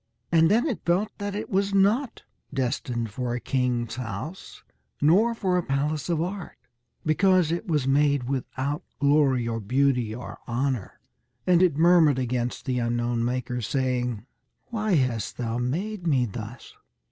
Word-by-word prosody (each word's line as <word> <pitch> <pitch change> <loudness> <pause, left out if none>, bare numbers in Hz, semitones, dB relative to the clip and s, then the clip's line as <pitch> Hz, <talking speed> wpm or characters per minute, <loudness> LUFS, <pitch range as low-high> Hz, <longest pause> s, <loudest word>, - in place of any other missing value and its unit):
And 165 -1 +5
then 225 +7 +3
it 270 -9 -2
felt 180 +5 0
that 205 0 -3
it 210 - -4
was 200 +1 0
not 220 +7 +2 0.3
destined 125 -3 -2
for 120 +2 -3
a - - -2
king's 125 -3 -1
house, 125 - -7 0.4
nor 200 +11 +4
for 185 -4 0
a - - -2
palace 145 +3 -1
of 170 -2 +1
art, 190 0 -6 0.5
because 180 +1 +3
it 175 +6 -2
was 150 -6 0
made 140 -1 +3
without 135 +2 -2 0.2
glory 140 -4 +3
or 115 -1 -2
beauty 125 0 +1
or 125 - -8
honour; 125 -3 -2 0.5
and 180 -1 +4
it 175 -6 +3
murmured 165 -4 +5
against 125 -1 -2
the 125 -2 0
unknown 120 0 0
maker, 125 0 -2
saying, 125 -2 -1 0.5
"Why 215 -4 +1
hast 125 -6 0
thou 115 -1 -2
made 175 +10 -2
me 135 -5 +3
thus?" 115 +2 -8
140 Hz, 150 wpm, -26 LUFS, 125-175 Hz, 0.5 s, And